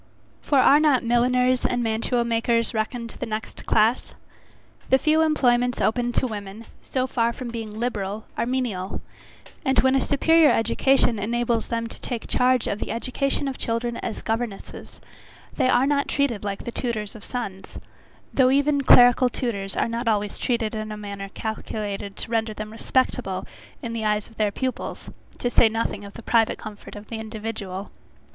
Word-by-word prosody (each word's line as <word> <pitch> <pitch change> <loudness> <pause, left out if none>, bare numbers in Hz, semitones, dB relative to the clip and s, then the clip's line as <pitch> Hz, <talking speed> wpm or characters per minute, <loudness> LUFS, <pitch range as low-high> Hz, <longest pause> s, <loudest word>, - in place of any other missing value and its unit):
For 285 - +1
are 275 +2 +6
not 295 -5 +3
milliners 250 +2 +2
and 245 -1 0
mantuamakers 230 +1 0
reckoned 230 +1 -3
the 250 - -3
next 220 0 -6
class? 220 +3 +2 0.7
The 265 - +6
few 310 +3 +3
employments 250 -6 +2
open 240 +2 +1
to - - +1
women, 210 -1 -6 0.2
so 255 -1 -1
far 235 -2 +1
from 245 0 -7
being 225 -2 -5
liberal, 215 -2 -3
are 230 - -1
menial; 230 -7 -2 0.6
and 265 -2 +1
when 260 0 +3
a 270 - +3
superior 320 +3 +4
education 230 0 +3
enables 235 +2 0
them 230 -1 -2
to 230 - -9
take 240 -3 -4
charge 250 -1 +2
of 200 - -2
the - - -4
education 275 +4 -1
of 270 - -4
children 235 +1 -2
as 220 - -5
governesses, 225 -2 -5 0.5
they 255 - +1
are 255 +1 +4
not 280 0 +1
treated 250 -8 0
like 200 -1 -4
the 240 - -5
tutors 220 -5 -3
of 215 - -11
sons, 195 -7 -6 0.6
though 260 -2 +5
even 285 +1 +3
clerical 245 -1 +7
tutors 200 -7 -3
are - - +2
not 230 +1 -3
always 210 -2 0
treated 235 -3 0
in 215 -1 -4
a 210 - -5
manner 200 -1 -6
calculated 205 -2 -4
to - - -6
render 225 -1 0
them 215 0 -6
respectable 255 +3 -1 0.4
in 230 -1 -4
the 225 -1 -3
eyes 210 -1 0
of 225 - -20
their 215 -1 +2
pupils, 255 +4 -4 0.3
to - - -2
say 230 - +5
nothing 220 -2 -2
of 200 0 -11
the 230 - -9
private 225 -1 +2
comfort 215 -1 -10
of 205 0 -10
the 225 - -4
individual. 215 -3 -5
230 Hz, 170 wpm, -24 LUFS, 215-250 Hz, 0.7 s, clerical